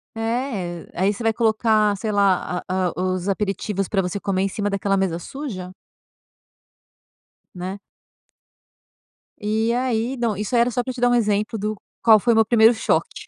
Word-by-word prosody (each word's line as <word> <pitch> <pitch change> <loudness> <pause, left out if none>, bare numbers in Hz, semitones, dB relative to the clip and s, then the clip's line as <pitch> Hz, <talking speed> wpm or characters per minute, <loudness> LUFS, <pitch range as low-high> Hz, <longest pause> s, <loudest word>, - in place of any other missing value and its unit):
É, 225 -7 -3
o - - -6
aí 200 +2 +3
você 200 - -9
vai 225 -1 +2
colocar, 220 -2 +2
sei 215 +2 -3
lá 195 -3 +1
a 185 0 0
a - - -7
os 185 +1 -1
aperitivos 195 0 -2
pra 195 - +1
você 180 +2 -3
comer 190 -1 -1
em - - +1
cima 205 +1 -2
daquela 200 0 0
mesa 185 -3 0
suja? 190 - -7 1.8
Né. 185 +2 -5 1.6
E 220 +2 0
aí 245 0 -1
não 235 -3 0
isso 210 +4 -3
aí 235 - +5
era 240 +1 +2
só 245 +2 -1
pra 255 - -4
te 245 - -8
dar 245 - +4
um 245 - +3
exemplo 215 -1 0
do 210 +2 -2 0.3
qual 220 -2 +7
foi 235 +3 +2
o - - +1
meu 225 0 +5
primeiro 225 +1 +5
choque 220 - -1
210 Hz, 180 wpm, -22 LUFS, 195-230 Hz, 1.8 s, qual